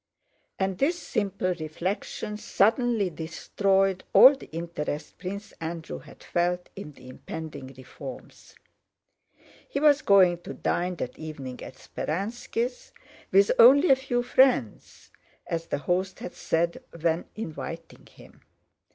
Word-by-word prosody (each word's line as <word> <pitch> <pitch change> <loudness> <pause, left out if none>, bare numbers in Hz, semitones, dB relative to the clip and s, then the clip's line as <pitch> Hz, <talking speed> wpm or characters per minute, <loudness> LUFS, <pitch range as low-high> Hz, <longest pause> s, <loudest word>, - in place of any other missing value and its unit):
And 190 -1 -1
this 330 +6 +2
simple 195 - -1
reflection 180 +6 -4
suddenly 220 -1 +1
destroyed 190 +4 0
all 265 - +10
the 270 - -13
interest 160 -2 -5
Prince 200 +3 -6
Andrew 165 0 -5
had - - -15
felt 175 +1 -1
in 170 -6 -8
the 125 - -15
impending 140 +1 -8
reforms. 130 -1 -11 1.1
He 280 - -2
was 295 0 +5
going 185 -4 +5
to - - -8
dine 180 +1 -1
that 125 - -6
evening 140 -5 -7
at - - -9
Speránski's, 230 - -4 0.4
"with 195 +1 +5
only 275 +8 +8
a - - +8
few 255 -2 -1
friends," 250 - +1 0.3
as 165 0 -3
the - - -1
host 180 +6 -1
had - - -7
said 170 +1 -1 0.2
when 165 +1 0
inviting 165 -4 -7
him. - - -18
180 Hz, 125 wpm, -27 LUFS, 160-215 Hz, 1.1 s, all